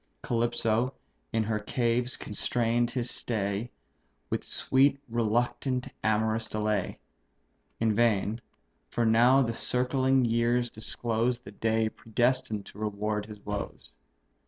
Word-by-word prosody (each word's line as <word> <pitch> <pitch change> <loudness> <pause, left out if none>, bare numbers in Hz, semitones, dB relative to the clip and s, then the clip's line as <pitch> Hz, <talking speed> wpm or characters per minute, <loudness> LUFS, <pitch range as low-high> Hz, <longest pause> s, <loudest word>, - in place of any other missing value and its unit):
Calypso 120 +1 +1 0.4
in 110 - +1
her 110 0 -1
caves 120 +2 0
constrain'd 120 +2 0
his 120 -1 -2
stay, 105 0 -2 0.6
With - - -1
sweet, 135 +1 +2
reluctant, 120 +3 0
amorous 110 +1 +1
delay; 105 -3 -1 0.8
In 110 -1 +2
vain 110 0 +2 0.5
for 120 - 0
now 120 +4 +5
the 115 -2 -1
circling 130 +2 +2
years 120 +1 +1
disclose 115 +2 -1
The 100 - -11
day 110 +1 +1
predestined 115 -1 0
to 100 - -12
reward 105 0 -2
his 105 -2 -11
woes. 105 0 -5
115 Hz, 110 wpm, -29 LUFS, 110-120 Hz, 0.8 s, now